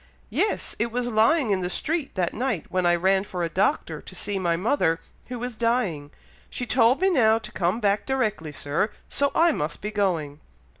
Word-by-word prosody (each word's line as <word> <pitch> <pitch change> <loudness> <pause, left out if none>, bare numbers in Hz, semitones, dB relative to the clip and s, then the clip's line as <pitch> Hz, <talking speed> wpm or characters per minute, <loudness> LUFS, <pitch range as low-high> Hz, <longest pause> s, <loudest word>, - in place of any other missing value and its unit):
"Yes! 425 - 0
it 230 +2 0
was 245 +1 -1
lying 230 +3 +3
in 190 -2 +1
the 180 - -2
street 310 - -2
that 180 -3 0
night 240 -7 -2
when 185 -1 +1
I 175 - +4
ran 190 +2 +2
for 180 -3 -4
a 170 - -1
Doctor 195 - 0
to - - -12
see 200 -1 -2
my 170 -2 +1
mother, 180 - +1 0.3
who 245 -1 -6
is 245 -2 -4
dying. 215 -12 0 0.4
She 245 - -4
told 245 +4 +3
me 380 0 +4
now 225 -8 +4
to 225 - -9
come 180 +5 0
back 205 -2 +1
directly, 215 - -1
Sir, 150 +8 -1 0.2
so 280 0 0
I 335 0 +5
must 150 - -3
be 210 - -4
going." 170 -8 -1
210 Hz, 200 wpm, -25 LUFS, 175-250 Hz, 0.4 s, I